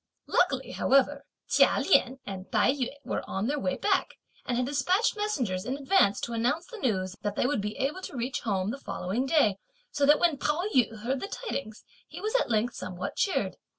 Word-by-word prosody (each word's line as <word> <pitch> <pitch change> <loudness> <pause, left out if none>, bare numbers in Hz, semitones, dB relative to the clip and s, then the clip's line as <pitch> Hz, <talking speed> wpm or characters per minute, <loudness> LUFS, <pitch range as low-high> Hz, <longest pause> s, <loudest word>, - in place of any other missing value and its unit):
Luckily, - - +1
however, 275 +1 +2 0.2
Chia - - +4
Lien 265 -6 +3
and 190 -1 -7
Tai - - +4
yü 265 -3 -1 0.2
were - - -2
on 195 +2 -2
their 290 +4 0
way 275 0 -1
back, 390 -2 0 0.3
and 240 - 0
had 250 - +1
despatched 290 - +1
messengers, 255 - -1
in 260 +2 -3
advance, 275 - +3
to 235 - -4
announce 245 +9 0
the 460 +3 -10
news 190 - -1
that 205 -1 -2
they - - +1
would 265 -4 +1
be 210 +1 -4
able 290 +8 -1
to 280 - -7
reach 245 +2 -2
home 195 -2 -1
the 275 - -6
following 230 +3 -3
day, 220 -11 +3 0.3
so 285 -1 +1
that 295 +1 +7
when 330 -5 +2
Pao 300 +4 0
yü 225 -4 +2
heard 260 +3 -1
the 395 - -4
tidings, 275 - -5 0.2
he - - -9
was 430 +1 -3
at - - +2
length 230 +2 +1
somewhat 185 0 -5
cheered. 390 - 0
260 Hz, 205 wpm, -28 LUFS, 215-295 Hz, 0.3 s, that